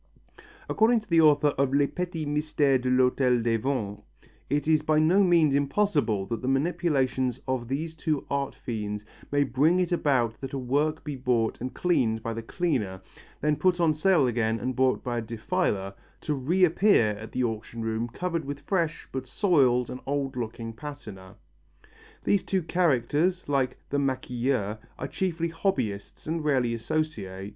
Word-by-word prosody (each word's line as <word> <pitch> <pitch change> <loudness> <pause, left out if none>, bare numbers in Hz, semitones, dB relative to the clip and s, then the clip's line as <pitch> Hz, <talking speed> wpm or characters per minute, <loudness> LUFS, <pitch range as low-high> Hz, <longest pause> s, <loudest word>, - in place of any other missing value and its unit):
According 225 +1 +3
to 210 - -21
the 165 -1 +6
author 150 -1 +5
of 135 0 +2
Les 145 0 +4
Petits 175 0 -4
Mystères 145 -2 +1
de 130 - -1
l'Hôtel 125 -1 +3
des 115 -1 +2
Ventes 110 -5 -2 0.5
it 145 +1 0
is 155 -1 +4
by 155 0 +1
no 165 +6 +4
means 170 -6 +4
impossible 140 - +1
that 115 +2 -4
the 130 - -4
manipulations 135 -4 0
of 130 -2 -2
these 155 +5 -3
two 155 -3 -2
art 140 -1 -1
fiends 105 -3 -5 0.3
may 145 0 +3
bring 145 +7 +2
it 180 -1 0
about 130 -9 +1
that 135 0 -6
a - - -1
work 145 +5 0
be 150 -2 -4
bought 125 -4 0
and 130 +1 -5
cleaned 115 -11 +1
by 115 - -2
the 115 - -4
cleaner, 115 - -2 0.4
then 150 +1 +2
put 180 +2 +2
on 165 -2 +3
sale 155 -1 +3
again 115 -2 0
and 130 +1 -3
bought 130 0 +2
by 120 -2 -2
a - - -3
defiler, 110 - -2 0.3
to 150 - -1
reappear 170 - +3
at 110 +1 -8
the 130 - -1
auction 115 0 -4
room 115 +1 -1
covered 170 +7 -3
with 140 +1 -6
fresh 170 -5 -1
but 130 -1 -5
soiled 130 - +3
and 125 - -6
old 140 -1 -1
looking 115 -1 -5
patina. 110 -8 -9 0.9
These 200 - +2
two 190 -2 -1
characters, 170 +2 +1
like 135 -3 0
the 140 - +1
maquilleur, 125 -5 -1 0.2
are 135 - -4
chiefly 170 +1 -2
hobbyists 165 - -2
and 160 +1 -2
rarely 130 -6 +1
associate. 115 -7 -3
135 Hz, 170 wpm, -27 LUFS, 120-160 Hz, 0.9 s, the